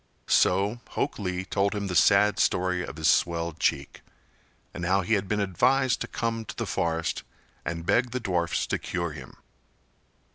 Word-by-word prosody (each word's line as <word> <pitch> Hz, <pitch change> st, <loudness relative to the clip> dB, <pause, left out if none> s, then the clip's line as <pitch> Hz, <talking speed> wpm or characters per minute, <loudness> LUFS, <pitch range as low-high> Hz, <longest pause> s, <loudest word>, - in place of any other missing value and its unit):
So 100 Hz, +5 st, +2 dB
Hok 140 Hz, -, -2 dB
Lee 90 Hz, -2 st, -3 dB
told 100 Hz, +1 st, 0 dB
him 100 Hz, -1 st, -2 dB
the 95 Hz, -, -3 dB
sad 100 Hz, +6 st, +4 dB
story 90 Hz, 0 st, +1 dB
of 75 Hz, -, -7 dB
his 80 Hz, -1 st, 0 dB
swelled 85 Hz, 0 st, +1 dB
cheek, 70 Hz, 0 st, -1 dB, 0.7 s
and 85 Hz, -, -6 dB
how 95 Hz, +3 st, +2 dB
he 105 Hz, +5 st, -1 dB
had 100 Hz, -2 st, +1 dB
been 105 Hz, +2 st, 0 dB
advised 125 Hz, +7 st, +2 dB
to -, -, -2 dB
come 115 Hz, -1 st, -2 dB
to -, -, -8 dB
the -, -, -3 dB
forest 80 Hz, -1 st, -1 dB, 0.4 s
and 85 Hz, -1 st, -4 dB
beg 120 Hz, +6 st, +2 dB
the 130 Hz, +2 st, -3 dB
dwarfs 90 Hz, -7 st, -1 dB
to -, -, -2 dB
cure 85 Hz, -2 st, -3 dB
him. 75 Hz, -, -11 dB
95 Hz, 175 wpm, -27 LUFS, 85-105 Hz, 0.7 s, sad